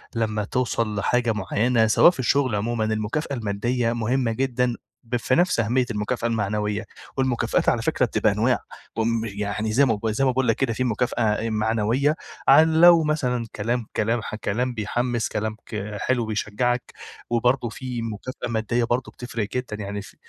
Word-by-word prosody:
لما 110 Hz, -2 st, 0 dB
توصل 115 Hz, -1 st, -1 dB
لحاجة 120 Hz, +3 st, +1 dB
معينة 110 Hz, +3 st, +1 dB
سواء 170 Hz, -, +6 dB
في 155 Hz, -, -13 dB
الشغل 130 Hz, -2 st, +2 dB
عمومًا، 110 Hz, +2 st, -1 dB
المكافأة 110 Hz, +8 st, -2 dB
المادية 115 Hz, +3 st, -1 dB
مهمة 120 Hz, +1 st, 0 dB
جدًا 125 Hz, 0 st, 0 dB, 0.3 s
ب 120 Hz, -, -2 dB
في 125 Hz, +2 st, +1 dB
نفس 175 Hz, -7 st, +2 dB
أهمية 125 Hz, +3 st, +2 dB
المكافأة 110 Hz, +3 st, -2 dB
المعنوية، 105 Hz, -1 st, -1 dB, 0.3 s
والمكافآت 130 Hz, -3 st, +1 dB
على -, -, +1 dB
فكرة -, -, +1 dB
بتبقى -, -, +1 dB
أنواع، -, -, +1 dB, 0.4 s
امم 115 Hz, 0 st, 0 dB
يعني 105 Hz, +1 st, -3 dB
زي 140 Hz, +4 st, +5 dB
ما 110 Hz, -4 st, 0 dB
زي 110 Hz, +5 st, 0 dB
ما -, -, +4 dB
باقول 130 Hz, 0 st, 0 dB
لك 115 Hz, -, +3 dB
كده 130 Hz, -4 st, 0 dB
في 130 Hz, -, -1 dB
مكافأة 120 Hz, 0 st, 0 dB
آآ 110 Hz, +1 st, 0 dB
معنوية 110 Hz, +7 st, +1 dB, 0.3 s
عن 160 Hz, 0 st, +6 dB
لو 170 Hz, -2 st, +8 dB
مثلًا 125 Hz, -6 st, 0 dB
كلام 115 Hz, +2 st, -1 dB
كلام 115 Hz, +2 st, +1 dB
ح 110 Hz, -, -6 dB
كلام 120 Hz, +4 st, -2 dB
بيحمس 120 Hz, +2 st, -1 dB
كلام 110 Hz, +1 st, -3 dB
ك 105 Hz, -1 st, -5 dB
حلو 125 Hz, -3 st, +1 dB
بيشجعك، 110 Hz, +3 st, -1 dB, 0.4 s
وبرضه 120 Hz, +1 st, +1 dB
في 125 Hz, -1 st, -5 dB
مكافأة 115 Hz, +3 st, -5 dB
مادية 115 Hz, +1 st, 0 dB
برضه 120 Hz, +1 st, -1 dB
بتفرق 115 Hz, -4 st, -4 dB
جدًا، 125 Hz, -4 st, -3 dB
يعني 100 Hz, +1 st, -4 dB
ف -, -, -14 dB
115 Hz, 170 wpm, -24 LUFS, 110-125 Hz, 0.4 s, لو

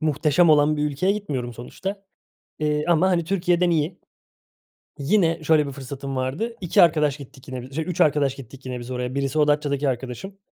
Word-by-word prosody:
muhteşem 155 Hz, +2 st, +3 dB
olan 150 Hz, 0 st, +4 dB
bir 150 Hz, -, 0 dB
ülkeye 150 Hz, +7 st, +1 dB
gitmiyorum 140 Hz, -13 st, -4 dB
sonuçta. 190 Hz, -, -6 dB, 0.6 s
Eee, 150 Hz, 0 st, 0 dB
ama, 175 Hz, +2 st, +4 dB
hani, 170 Hz, -2 st, +2 dB
Türkiye'den 175 Hz, -1 st, +1 dB
iyi. 165 Hz, +2 st, 0 dB, 1.0 s
Yine 165 Hz, +1 st, +2 dB
şöyle 155 Hz, -1 st, +4 dB
bir 140 Hz, -, -5 dB
fırsatım 135 Hz, 0 st, -6 dB
vardı, 140 Hz, -, -2 dB
2 175 Hz, -1 st, +4 dB
arkadaş 150 Hz, -4 st, +3 dB
gittik 135 Hz, -2 st, -13 dB
yine, 130 Hz, 0 st, -7 dB
şe 160 Hz, +3 st, -2 dB
3 180 Hz, 0 st, -4 dB
arkadaş 145 Hz, -3 st, +3 dB
gittik 130 Hz, 0 st, -12 dB
yine 125 Hz, -1 st, -4 dB
biz 120 Hz, +1 st, -8 dB
oraya. 125 Hz, 0 st, -3 dB
Birisi 140 Hz, +2 st, -1 dB
o 150 Hz, -1 st, +4 dB
Datça'daki 145 Hz, -1 st, +1 dB
arkadaşım, 130 Hz, -, -5 dB
150 Hz, 175 wpm, -23 LUFS, 135-170 Hz, 1.0 s, olan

